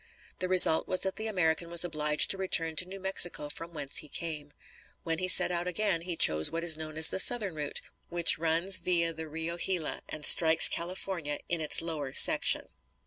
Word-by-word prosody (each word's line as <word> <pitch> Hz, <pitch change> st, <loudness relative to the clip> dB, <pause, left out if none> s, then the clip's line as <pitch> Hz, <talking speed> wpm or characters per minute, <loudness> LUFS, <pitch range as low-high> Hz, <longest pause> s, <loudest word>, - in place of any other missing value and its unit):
The 185 Hz, -, -5 dB
result 180 Hz, -3 st, +6 dB
was 185 Hz, -, -4 dB
that 190 Hz, 0 st, -4 dB
the 220 Hz, -, -6 dB
American 170 Hz, -4 st, -4 dB
was 170 Hz, +1 st, +1 dB
obliged 150 Hz, -2 st, 0 dB
to 195 Hz, -, -2 dB
return 165 Hz, -4 st, 0 dB
to 180 Hz, -, +1 dB
New 195 Hz, +1 st, -12 dB
Mexico 180 Hz, -5 st, -1 dB
from 165 Hz, +3 st, -11 dB
whence 145 Hz, -4 st, -5 dB
he 150 Hz, -, -3 dB
came. 150 Hz, -3 st, -6 dB, 0.5 s
When 165 Hz, -1 st, -6 dB
he 185 Hz, -, -5 dB
set 180 Hz, -, +4 dB
out 175 Hz, 0 st, -5 dB
again, 180 Hz, -1 st, -2 dB
he 175 Hz, 0 st, -7 dB
chose 80 Hz, -, +2 dB
what 165 Hz, 0 st, -7 dB
is 165 Hz, -2 st, +3 dB
known 155 Hz, 0 st, -10 dB
as 160 Hz, -, +4 dB
the -, -, -5 dB
Southern 210 Hz, -3 st, +3 dB
Route, 150 Hz, -2 st, -6 dB, 0.3 s
which 170 Hz, -3 st, 0 dB
runs 170 Hz, +4 st, +2 dB
via 170 Hz, -2 st, -2 dB
the 160 Hz, 0 st, -10 dB
Rio 160 Hz, +2 st, -7 dB
Gila 175 Hz, -4 st, -5 dB
and 155 Hz, -1 st, -4 dB
strikes 160 Hz, -1 st, +8 dB
California 170 Hz, -3 st, -6 dB
in 170 Hz, -2 st, -4 dB
its 155 Hz, +1 st, -2 dB
lower 150 Hz, -5 st, -8 dB
section. -, -, +1 dB
170 Hz, 200 wpm, -26 LUFS, 155-180 Hz, 0.5 s, strikes